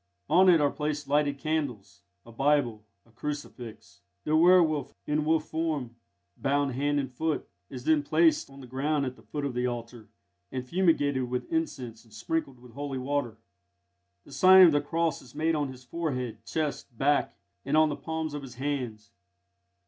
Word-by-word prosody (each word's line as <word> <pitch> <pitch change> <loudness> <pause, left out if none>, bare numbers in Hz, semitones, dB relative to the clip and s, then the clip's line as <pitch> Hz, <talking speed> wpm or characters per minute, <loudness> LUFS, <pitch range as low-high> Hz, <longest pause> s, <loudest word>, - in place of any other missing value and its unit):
On 185 +3 +6
it 170 -2 +6
are 145 -1 +2
placed 150 -1 -3
lighted 145 0 +1
candles, 125 -11 -3 0.2
a 115 - -13
Bible, 125 -4 +1 0.2
a 115 - -24
crucifix. 120 -6 -7 0.2
The 155 - +1
werwolf, 165 -3 +4
in 150 0 0
wolf 160 0 +1
form, 155 -7 -2 0.4
bound 140 0 0
hand 145 +3 0
and 135 -2 -4
foot, 160 +3 -2 0.2
is 125 -2 -8
then 155 0 +3
placed 160 +2 +2
on 135 0 -13
the - - -10
ground 140 +3 -1
at 130 -1 -4
the - - -18
foot 145 -1 -5
of 140 - -2
the 125 +1 0
altar, 120 -2 -6 0.4
and 130 -1 -4
fumigated 145 -7 +1
with 125 - -4
incense 125 - -3
and 115 - -23
sprinkled 130 +3 -3
with 125 -1 -15
holy 140 +2 -5
water. 130 -3 -2 0.9
The - - -15
sign 185 +7 +8
of 170 - +6
the 145 -1 +2
cross 165 +1 -1
is 125 0 -16
made 160 +2 +1
on 145 -3 -1
his 130 -1 -13
forehead, 125 -6 -4
chest, 145 -6 -3
back, 145 +3 +1 0.3
and 140 +3 +1
on 155 0 +5
the 145 - -2
palms 160 -1 -4
of 145 - -4
his 130 -3 -10
hands. 125 -6 -4
145 Hz, 180 wpm, -28 LUFS, 125-155 Hz, 0.9 s, sign